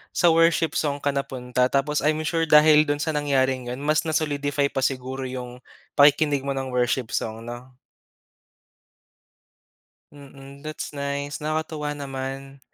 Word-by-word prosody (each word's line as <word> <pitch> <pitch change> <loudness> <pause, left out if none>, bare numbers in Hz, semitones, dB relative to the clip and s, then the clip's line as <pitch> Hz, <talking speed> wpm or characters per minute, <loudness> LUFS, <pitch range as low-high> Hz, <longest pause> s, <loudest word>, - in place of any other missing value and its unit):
sa 175 - +4
worship 165 -1 +3
song 145 -2 0
ka 145 - 0
napunta 125 -2 -1
tapos 145 +2 +1
I'm 155 +1 +2
sure 165 +3 0
dahil 150 0 +7
dun 145 0 0
sa 160 +1 -2
nangyaring 130 -3 0
yun 125 - -5
mas 150 +2 +1
na 160 - -2
solidify 145 -2 0
pa 135 -1 -3
siguro 130 0 -2
yung 125 -1 -6 0.4
pakikinig 145 -1 +4
mo 140 - -2
ng 135 -1 -4
worship 125 -1 0
song, 110 +1 -3
'no? 120 +2 -9 2.4
Mm, 140 0 -14
that's 155 -1 -6
nice. 140 +1 -3
Nakakatuwa 155 -1 -2
naman. 135 -1 -6
140 Hz, 140 wpm, -24 LUFS, 130-150 Hz, 2.4 s, dahil